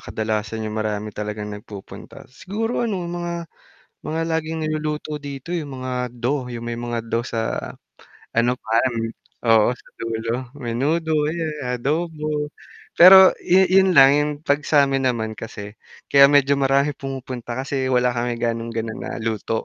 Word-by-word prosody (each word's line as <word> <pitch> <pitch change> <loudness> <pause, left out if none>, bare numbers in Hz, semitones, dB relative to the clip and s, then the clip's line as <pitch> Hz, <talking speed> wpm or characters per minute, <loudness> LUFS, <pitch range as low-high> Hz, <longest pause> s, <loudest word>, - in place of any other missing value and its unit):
kadalasan 110 0 -3
yung 110 0 -4
marami 105 0 -3
talagang 105 0 -5
nagpupunta. 105 -1 -10
Siguro 220 - -3
ano 195 -5 -2
mga 170 -1 -4 0.6
mga 160 +1 -3
laging 160 0 -3
niluluto 155 0 -3
dito 140 +4 -6
yung 145 -6 -4
mga 125 -1 -3
do, 125 +2 -2
yung 120 -1 -6
may 120 0 -4
mga 120 -1 -4
do 115 +1 -1
sa 115 -2 -3 0.7
ano 120 +2 +3
parang, 115 +2 0 0.5
oo, 110 -2 +6
sa - - -20
dulo 115 0 -3 0.2
menudo, 145 +7 -1 0.2
ayan, 160 -1 -2 0.2
adobo. 150 +1 -2 0.5
Pero 190 +2 +10
yu 190 +2 +4
yun 190 -1 +4
lang 135 0 +9
yung 150 0 +1
'pag 145 +1 +2
sa'min 135 -3 +3
naman 110 -3 -2
kasi 105 -2 -8 0.4
kaya 140 0 +8
medyo 140 -1 +4
maraming 140 +1 +2
pumupunta 130 -3 -6
kasi 135 -1 -2
wala 125 -1 +2
kami 120 0 -2
gaanong 115 0 -2
gano'n 110 -1 -3
na - - -6
luto. 110 0 -2
130 Hz, 145 wpm, -22 LUFS, 115-155 Hz, 0.7 s, Pero